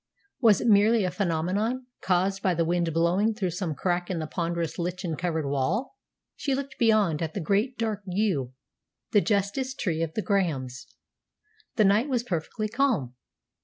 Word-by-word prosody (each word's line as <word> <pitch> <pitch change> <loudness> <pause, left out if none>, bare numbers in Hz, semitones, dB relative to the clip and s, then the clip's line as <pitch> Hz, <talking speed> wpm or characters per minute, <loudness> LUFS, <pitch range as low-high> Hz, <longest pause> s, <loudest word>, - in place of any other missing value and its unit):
Was 225 -5 +5
it - - -1
merely 215 +1 +5
a 180 - 0
phenomenon 195 +7 -1 0.2
caused 190 +2 +1
by 185 -4 +1
the 165 0 +1
wind 170 0 0
blowing 180 +7 +2
through 190 -5 -1
some 170 -3 -3
crack 175 +3 -1
in 185 - -2
the 160 - -2
ponderous 170 0 -3
lichen 175 -1 -2
covered 160 -2 -2
wall? 160 - -1 0.4
She 275 -2 -1
looked 275 0 -6
beyond 215 -9 +3
at 160 -1 -3
the - - -1
great 205 - 0
dark 220 -3 -2
yew, 180 - 0 0.6
the 205 - +5
justice 215 +6 0
tree 165 -9 -1
of 165 -1 -3
the 215 - -1
Grahams. 145 - -1 0.9
The 215 - +4
night 210 +8 +3
was 245 -3 0
perfectly 200 +2 -3
calm. 220 - 0
190 Hz, 165 wpm, -27 LUFS, 165-220 Hz, 0.9 s, Was